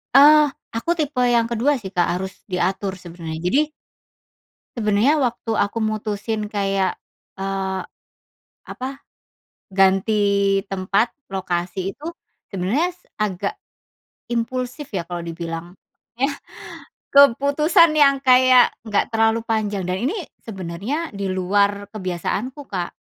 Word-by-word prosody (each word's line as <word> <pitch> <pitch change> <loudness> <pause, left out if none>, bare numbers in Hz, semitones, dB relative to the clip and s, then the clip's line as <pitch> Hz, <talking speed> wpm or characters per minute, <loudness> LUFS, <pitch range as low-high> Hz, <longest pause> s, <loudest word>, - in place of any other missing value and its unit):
Eee, 300 +2 +9 0.3
aku 235 +9 -1
tipe 290 -4 0
yang 230 -1 +3
kedua 235 +5 +2
sih, 190 -2 -7
Kak, 175 -1 +3
harus 190 +2 -3 0.2
diatur 190 +2 -1
sebenarnya, 170 -2 -7
jadi 295 +10 +2 1.1
sebenarnya 225 +7 +3
waktu 240 -3 -1
aku 200 +3 -4
mutusin 215 0 -2
kayak, 195 -2 0 0.4
eee, 195 -1 -2 0.8
apa 255 - -6 0.9
ganti 195 +2 +4 0.6
tempat, 195 +4 +1 0.2
lokasi 180 -1 -2
itu 295 - -14 0.5
sebenarnya 200 - 0 0.4
agak 190 - -2 0.8
impulsif 250 +4 -2
ya 175 - -1
kalau 175 0 -4
dibilang 165 0 -6 0.5
iya, 275 +3 +2 0.8
keputusan 285 - +5
yang 280 -2 +6
kayak 255 -1 +6
nggak 210 -3 0
terlalu 225 0 +3
panjang 210 -3 0
dan 180 - 0
ini 350 - -2 0.3
sebenernya 190 - -4 0.2
diluar 200 +1 0
kebiasaanku, 210 - -3
Kak, 180 -3 -2
205 Hz, 105 wpm, -21 LUFS, 190-255 Hz, 1.1 s, Eee